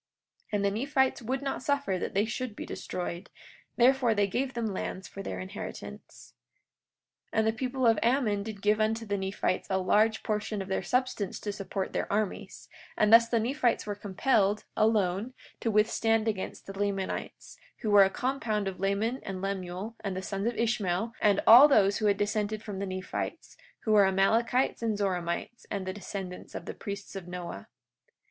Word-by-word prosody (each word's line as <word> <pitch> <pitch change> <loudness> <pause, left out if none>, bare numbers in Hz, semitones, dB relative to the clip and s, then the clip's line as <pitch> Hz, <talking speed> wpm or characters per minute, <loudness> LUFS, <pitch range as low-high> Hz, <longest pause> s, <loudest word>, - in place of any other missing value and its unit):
43:12 - - -46
And 200 -1 +1
the 200 - +2
Nephites 265 +4 +1
would 255 +4 -2
not 275 - -2
suffer 280 -9 0
that - - -4
they 205 +2 +3
should 235 0 -4
be - - -6
destroyed; 175 +1 -5 0.5
therefore 250 -2 +4
they 205 -1 +3
gave 255 +6 -2
them 235 -1 -1
lands 185 -1 -4
for 195 - -8
their 95 - -5
inheritance. 95 -6 -8 1.0
43:13 - - -5
And 220 0 +3
the 220 - +2
people 255 +2 -2
of 225 -2 +5
Ammon 230 -4 +2
did 205 -1 -7
give 210 +1 +3
unto 225 +1 0
the 205 -1 -1
Nephites 190 0 -1
a 190 - +1
large 215 +4 +2
portion 210 0 -2
of 195 0 -5
their 190 - 0
substance 250 -2 -1
to 205 - -3
support 195 -1 -4
their - - -2
armies; 205 -1 -3 0.3
and 210 +1 +4
thus 230 0 +8
the 230 - +2
Nephites 245 +1 +1
were 205 - -2
compelled, 205 +1 +1
alone, 215 +1 +1 0.2
to 230 - -1
withstand 225 +1 +2
against 205 -4 -3
the 195 - -7
Lamanites, 195 -1 -4 0.2
who 215 - -1
were 205 -1 +8
a 190 - +3
compound 220 -4 -1
of 190 -2 -5
Laman 205 +6 0
and 190 -1 -5
Lemuel, 195 +2 -4
and 195 -3 -3
the 190 - -4
sons 195 +2 -2
of 240 - -2
Ishmael, 220 -2 0
and 205 -2 +4
all 245 +6 +10
those 205 -8 +4
who 215 - +1
had 200 -1 +3
dissented 215 +1 -1
from 205 -3 -6
the 200 - -3
Nephites, 185 0 -5 0.3
who 220 - -1
were 205 -2 +7
Amalekites 225 +8 +2
and 225 -3 0
Zoramites, 185 +3 -2
and 200 -2 -3
the 185 - -3
descendants 190 -2 -7
of - - -6
the - - -5
priests 200 -1 -7
of 190 -2 -6
Noah. 175 - -7
210 Hz, 185 wpm, -29 LUFS, 195-230 Hz, 1.0 s, all